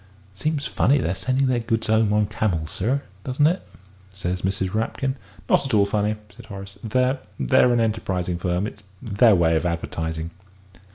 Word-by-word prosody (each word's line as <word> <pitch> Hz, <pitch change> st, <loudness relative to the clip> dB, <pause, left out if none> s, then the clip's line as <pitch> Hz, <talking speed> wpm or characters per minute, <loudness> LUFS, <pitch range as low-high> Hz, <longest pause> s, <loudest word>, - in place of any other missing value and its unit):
"Seems 150 Hz, +6 st, -2 dB
funny 140 Hz, +3 st, +3 dB
their 95 Hz, -9 st, 0 dB
sending 130 Hz, +7 st, 0 dB
their 130 Hz, -2 st, +2 dB
goods 115 Hz, -1 st, -1 dB
'ome 110 Hz, -1 st, +3 dB
on 105 Hz, 0 st, +3 dB
camels, 95 Hz, -6 st, -1 dB
sir, 130 Hz, +8 st, 0 dB, 0.2 s
doesn't 130 Hz, +5 st, +1 dB
it?" 175 Hz, +4 st, +2 dB, 0.5 s
said 90 Hz, -1 st, -3 dB
Mrs. 95 Hz, 0 st, -1 dB
Rapkin. 130 Hz, +5 st, -1 dB, 0.3 s
"Not -, -, +4 dB
at 130 Hz, -, 0 dB
all 100 Hz, -1 st, +5 dB
funny!" 105 Hz, +1 st, 0 dB, 0.2 s
said 120 Hz, -2 st, -13 dB
Horace; 100 Hz, -2 st, -9 dB
"they 125 Hz, +4 st, +1 dB, 0.2 s
they're 130 Hz, -2 st, +4 dB
an 120 Hz, -, +3 dB
enterprising 95 Hz, -6 st, -1 dB
firm 90 Hz, +3 st, 0 dB, 0.3 s
their 110 Hz, -1 st, +4 dB
way 85 Hz, -2 st, +3 dB
of 80 Hz, -, +1 dB
advertising." 80 Hz, -1 st, -3 dB
105 Hz, 165 wpm, -23 LUFS, 90-125 Hz, 0.5 s, all